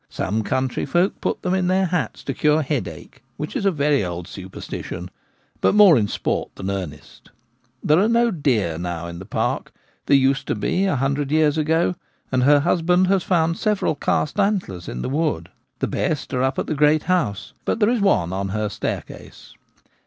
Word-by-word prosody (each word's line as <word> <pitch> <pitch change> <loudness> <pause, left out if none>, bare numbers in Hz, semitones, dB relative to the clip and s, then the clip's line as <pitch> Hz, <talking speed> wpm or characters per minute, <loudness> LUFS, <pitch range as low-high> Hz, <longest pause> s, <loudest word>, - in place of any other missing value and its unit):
Some 105 +3 -2
country 130 +3 -1
folk 175 +6 +1
put - - -2
them 180 - 0
in 185 -1 +1
their 190 +1 +2
hats 180 -2 -2
to 135 - -3
cure 150 +3 +2
headache, 120 - -5 0.2
ivbich 150 - -5
is 200 - 0
a - - +4
very 145 - +1
old 90 -1 -5
superstition; 95 -1 -7 0.5
but - - +2
more 205 -6 +8
in 110 -5 +2
sport - - -2
than 95 +1 -4
earnest 90 -7 -7 0.5
There 155 +3 +4
are 205 - +3
no 235 0 +3
deer 115 - 0
now 85 -1 -4
in 85 0 -7
the 95 - -10
park. - - -2 0.4
There 140 - +6
used 135 0 +1
to - - 0
be 190 +2 0
a 190 - +1
hundred 135 +1 -1
years 155 -1 +3
ago, 160 +3 +1 0.4
and 130 -1 +2
her 145 +2 +5
hus 170 +2 +1
band 180 +2 +3
has 195 -1 +3
found 165 -2 +1
several 210 -6 +1
cast 150 +4 -1
antlers 190 - -1
in 60 - -5
the - - -2
wood. 140 - -1 0.3
The - - -1
best 150 -3 -2
are 125 - 0
up 130 +1 0
at - - -1
the - - -2
great 150 +1 +3
house, 170 - -1
but - - -1
there 210 - +4
is 240 -3 +1
one 95 - +2
on 95 0 -2
her 105 +1 -1
staircase. - - -6
145 Hz, 195 wpm, -22 LUFS, -, 0.5 s, more